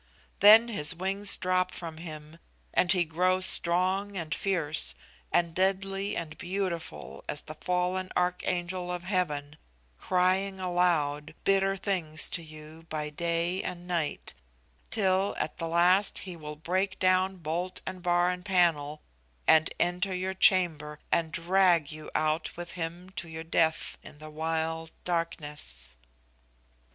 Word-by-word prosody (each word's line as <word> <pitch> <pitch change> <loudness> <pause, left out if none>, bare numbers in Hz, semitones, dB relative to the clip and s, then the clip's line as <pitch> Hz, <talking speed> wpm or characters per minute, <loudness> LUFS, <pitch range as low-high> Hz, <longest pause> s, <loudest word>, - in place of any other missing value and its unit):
Then 220 +4 +8
his 180 -6 +3
wings 195 +3 +1
drop 185 0 +1
from 165 -2 -7
him, 155 -1 -9 0.3
and 180 - +3
he 180 -3 +3
grows 185 +3 +2
strong 185 +4 +3
and 165 -2 -3
fierce, 155 - -1 0.4
and 170 -1 +1
deadly 195 +2 0
and 155 -2 -5
beautiful, 170 - -4
as 145 - -1
the 155 - -8
fallen 180 +3 -2
archangel 180 0 -1
of 175 -1 -4
heaven, 150 -6 -2 0.4
crying 185 - +1
aloud 170 -5 0
bitter 195 0 +2
things 175 -6 +1
to 170 - -2
you 155 +1 -12
by 150 -1 -3
day 170 +3 0
and 175 0 -6
night; 170 -4 -2 0.6
till 195 -2 +1
at 155 - -3
the 165 - -2
last 180 +4 +3
he 185 -2 -3
will 150 -2 -8
break 185 +5 -1
down 185 +1 +2
bolt 175 +3 -3
and 185 -1 -6
bar 175 0 +2
and 180 0 -6
panel, 165 -6 +1 0.4
and 160 0 +5
enter 180 +2 0
your 185 +1 -2
chamber, 165 -6 +3
and 165 -1 +1
drag 170 -3 +2
you 155 0 -9
out 155 +2 -1
with 175 -1 -6
him 175 +2 -6
to 185 -3 -5
your 160 0 -6
death 160 -1 0
in - - -13
the 155 +1 -11
wild 160 +1 -2
darkness. 150 - -2
175 Hz, 140 wpm, -28 LUFS, 160-185 Hz, 0.6 s, Then